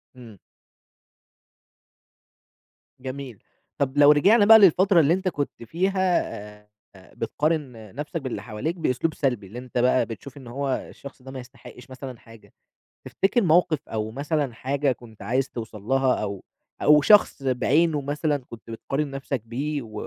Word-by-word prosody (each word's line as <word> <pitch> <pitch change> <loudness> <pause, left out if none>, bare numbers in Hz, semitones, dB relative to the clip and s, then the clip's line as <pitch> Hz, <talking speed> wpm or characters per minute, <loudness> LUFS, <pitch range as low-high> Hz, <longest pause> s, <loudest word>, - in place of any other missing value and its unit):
إمم. 115 -6 -13 2.6
جميل، 130 -4 -8 0.3
طَب 140 0 -1
لو 145 0 +8
رجعنا 205 +9 +5
بقى 220 +1 +9
للفترة 190 0 +5
اللي 160 +1 +4
أنت 190 +1 -2
كنت 145 -8 -3
فيها 185 - +1 0.4
آآ، 105 - -32 0.4
بتقارن 125 - -3
نفسك 150 +3 -4
باللي 130 -2 -5
حواليك 135 +11 -4
بأسلوب 160 -1 -1
سلبي، 125 -10 -2
اللي 115 +6 -8
أنت 125 -1 -7
بقى 125 +1 +3
بتشوف 125 +5 -10
إن 130 - -12
هو 135 +3 -3 0.2
الشخص 140 -2 -12
ده 130 +1 -10
ما 130 - -7
يستحقش 125 0 -13
مثلًا 130 -2 -9
حاجة، 115 -1 -17 0.5
تفتكر 220 +5 +1
موقف 165 -2 +3
أو 110 0 -3
مثلًا 145 0 -2
حاجة 135 +4 -1
كنت 115 -4 -10
عايز 130 +6 -1
توصل 110 -3 -8
لها 135 +2 +2
أو 100 -2 -5 0.4
أو 150 0 +6
شخص 205 -5 +4
بعينُه 145 +4 +2
مثلًا 145 +1 -1
كنت 115 -1 -12
بتقارن 135 +5 -3
نفسك 135 -2 -4
بيه 140 +5 -3
و 110 -2 -12
135 Hz, 145 wpm, -24 LUFS, 120-155 Hz, 2.6 s, بقى